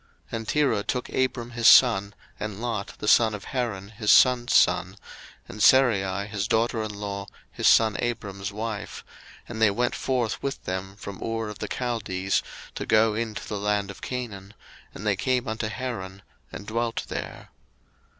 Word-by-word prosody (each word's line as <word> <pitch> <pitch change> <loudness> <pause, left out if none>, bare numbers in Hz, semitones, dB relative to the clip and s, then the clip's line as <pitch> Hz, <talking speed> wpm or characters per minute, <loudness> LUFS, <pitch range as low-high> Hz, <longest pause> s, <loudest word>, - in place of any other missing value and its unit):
01:011:031 - - -2
And 115 -1 -7
Terah 145 -9 +1
took 125 +2 -3
Abram 120 -2 -1
his 120 -1 +2
son, 100 -5 +6 0.2
and 105 -1 -5
Lot 115 -4 -4
the 105 - -5
son 110 0 +5
of 100 - -9
Haran 110 -7 -3
his 105 -1 -4
son's 125 -2 +5
son, - - +3 0.5
and 105 - -8
Sarai 100 -7 +4
his 105 -1 -3
daughter 115 0 +1
in 110 -1 -4
law, 100 -1 -5 0.2
his - - 0
son 110 -2 +5
Abram's 100 -4 -3
wife; 105 0 -5 0.4
and 110 - -6
they 110 - +6
went 120 +5 0
forth 125 -4 -1
with 140 - -4
them 95 +1 -4
from 100 -1 -9
Ur 115 -1 -3
of 105 - -9
the - - -4
Chaldees, 100 -6 -1 0.3
to - - -5
go 110 0 +4
into 110 -1 -4
the 105 - -4
land 105 -1 0
of - - -13
Canaan; 105 -6 -6 0.4
and 105 - -9
they 105 -2 +2
came 125 +4 0
unto 110 0 -2
Haran, 105 -5 -5 0.3
and 100 - -8
dwelt 115 +1 -2
there. - - -6
110 Hz, 170 wpm, -25 LUFS, 100-120 Hz, 0.5 s, son